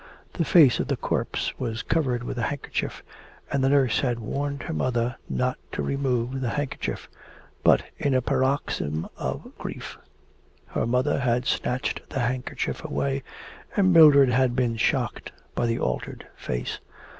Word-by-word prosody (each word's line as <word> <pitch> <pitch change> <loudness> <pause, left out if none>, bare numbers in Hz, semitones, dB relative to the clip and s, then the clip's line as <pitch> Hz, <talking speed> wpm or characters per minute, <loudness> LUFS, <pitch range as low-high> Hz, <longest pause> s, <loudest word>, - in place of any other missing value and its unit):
The 165 - 0
face 150 -8 +6
of - - -1
the - - 0
corpse - - -1
was 115 -3 -3
covered 130 -7 0
with 125 - -4
a 120 - 0
handkerchief, 145 -1 -4 0.5
and 140 -1 +1
the 135 - +4
nurse 135 -5 +3
had 125 -3 0
warned 140 +5 -3
her 165 - -4
mother 125 -3 0
not 125 0 0
to - - -2
remove 130 -2 -1
the 125 - 0
handkerchief. 145 +1 -3 0.6
But, - - +5 0.2
in 140 -2 +1
a 130 - +3
paroxysm 130 - 0
of - - -4
grief, - - -7 0.7
her - - -1
mother 125 +5 +1
had 125 -1 +1
snatched 125 +1 -1
the 135 - -2
handkerchief 125 +1 -2
away, 70 -1 -1 0.6
and 185 -2 +5
Mildred 145 -5 +8
had 125 0 +2
been 120 -3 +1
shocked 110 - -1 0.2
by 120 - 0
the 115 0 0
altered 60 - -3
face. - - -4
130 Hz, 155 wpm, -25 LUFS, 120-140 Hz, 0.7 s, Mildred